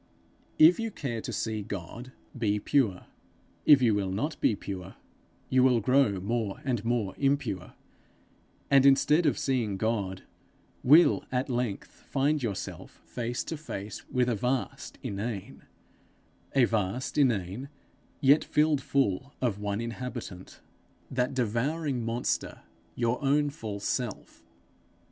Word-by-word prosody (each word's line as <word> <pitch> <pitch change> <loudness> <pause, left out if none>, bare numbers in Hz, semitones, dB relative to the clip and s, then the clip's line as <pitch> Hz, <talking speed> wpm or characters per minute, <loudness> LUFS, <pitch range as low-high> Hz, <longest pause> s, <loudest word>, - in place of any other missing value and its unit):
If 165 +6 +7
you 225 0 -1
care 120 - -4
to - - -5
see 110 -1 -2
God, 100 +6 -7 0.2
be 105 -4 0
pure. 110 -6 +1 0.6
If 140 -3 +8
you 115 -3 +4
will 100 -2 0
not 115 +12 -3
be 110 - +3
pure, 95 -2 -7 0.6
you 130 - +5
will 125 -2 +5
grow 115 -3 +3
more 105 +1 -2
and 120 -6 -1
more 115 -5 0
impure; 135 -10 -1 1.0
and 135 -1 +7
instead 150 +4 +5
of 145 - +2
seeing 120 -7 0
God, 100 -3 -2 0.6
will 155 +7 +6
at 130 +1 -1
length 120 -5 -2 0.2
find 145 +2 +1
yourself 105 -6 -5
face 120 0 -3
to 160 - -5
face 105 -9 -7
with 125 -2 +1
a 120 - +1
vast 125 +4 -2
inane 100 0 -5 0.9
a 135 - +5
vast 110 +2 -2
inane, 120 -1 0 0.5
yet 140 +2 +5
filled 150 -2 +2
full 135 -1 0
of 115 -6 -1
one 105 0 -2
inhabitant, 115 -5 -6 0.5
that 125 +1 0
devouring 130 +3 -1
monster, 115 +2 -2 0.3
your 120 +3 0
own 145 +1 +2
false 105 -7 -6
self. 120 -6 -3
120 Hz, 130 wpm, -28 LUFS, 105-135 Hz, 1.0 s, If